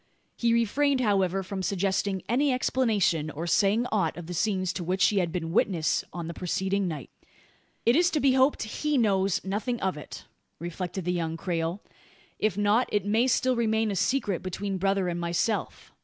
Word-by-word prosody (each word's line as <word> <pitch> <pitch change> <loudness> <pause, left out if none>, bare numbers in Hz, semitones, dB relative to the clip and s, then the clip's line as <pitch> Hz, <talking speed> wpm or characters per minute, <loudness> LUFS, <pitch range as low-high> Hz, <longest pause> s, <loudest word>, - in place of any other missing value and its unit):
He 235 -1 +1
refrained, 260 +5 +2
however, 195 -5 +1
from 190 +1 -5
suggesting 190 0 -1
any 275 +5 +2
explanation, 215 -11 +1
or 160 +2 -5
saying 205 +6 +2
aught 190 -8 0
of 175 - -7
the 180 - -6
scenes 185 0 0
to 180 - -4
which 185 +2 +2
he 205 - +1
had 175 -3 0
been 165 -1 -3
witness 175 -4 +1
on 170 -2 -5
the 170 - -5
preceding 190 +3 -1
night. 150 -7 -6 0.7
"It 235 - +5
is 345 +2 +4
to 305 - 0
be 275 -2 +4
hoped 265 +2 +3
he 295 +7 -1
knows 195 -5 +2
nothing 215 +5 -2
of 190 -4 -1
it," 150 - -9 0.3
reflected 175 +2 -5
the 180 - 0
young 165 -2 -2
Creole. 170 +2 -2 0.6
"If 215 -3 0
not, 205 +4 +2
it 205 -2 0
may 220 +5 +2
still 255 0 +2
remain 220 -2 +1
a - - -2
secret 200 -1 0
between 190 +1 -4
brother 195 0 +1
and 175 0 -2
myself. 175 +5 -2
195 Hz, 185 wpm, -27 LUFS, 175-225 Hz, 0.7 s, It